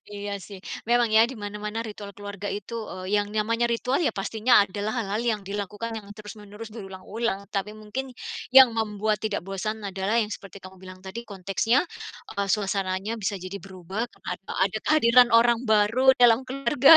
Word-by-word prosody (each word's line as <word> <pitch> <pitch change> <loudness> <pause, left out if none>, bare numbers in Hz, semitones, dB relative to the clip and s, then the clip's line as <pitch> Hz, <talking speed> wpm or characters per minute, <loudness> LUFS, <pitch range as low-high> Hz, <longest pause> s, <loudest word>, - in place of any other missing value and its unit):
Iya 205 0 -5
sih, 200 +1 -10 0.3
memang 240 -2 +3
ya, 225 +2 +6
di 265 - -7
mana-mana 210 +2 -4
ritual 205 -2 -8
keluarga 205 0 -6
itu, 205 +3 -5 0.2
eee, 185 +1 -6
yang 205 - -4
namanya 230 +3 0
ritual, 250 +4 0
ya 330 - +3
pastinya 215 +2 +3
adalah 205 +4 -4
hal-hal 210 -1 -1
yang 230 -3 0
dilakukan 205 +3 -4
yang 215 -3 -7
terus-menerus 210 +1 -10
berulang-ulang, 200 0 -4
tapi 210 +1 -2
mungkin 215 +5 -5 0.5
yang 260 -3 +10
membuat 215 -1 -1
tidak 215 -4 -2
bosan 210 +3 -4
adalah 195 +2 -1
yang 215 -2 +1
seperti 195 -1 -9
kamu 185 0 -12
bilang 185 0 -11
tadi 190 +5 -6
konteksnya, 200 - +1 0.5
eee, 200 -1 -2
suasananya 195 0 0
bisa 200 0 -1
jadi 185 +2 -7
berubah 195 +4 -5
karena - - -9
ad - - -7 0.3
ada 215 - -1
kehadiran 250 -5 +6
orang 235 0 +4
baru 225 +5 +5
dalam 240 -1 +6
keluarga, 275 +3 +6
210 Hz, 170 wpm, -26 LUFS, 200-230 Hz, 0.5 s, yang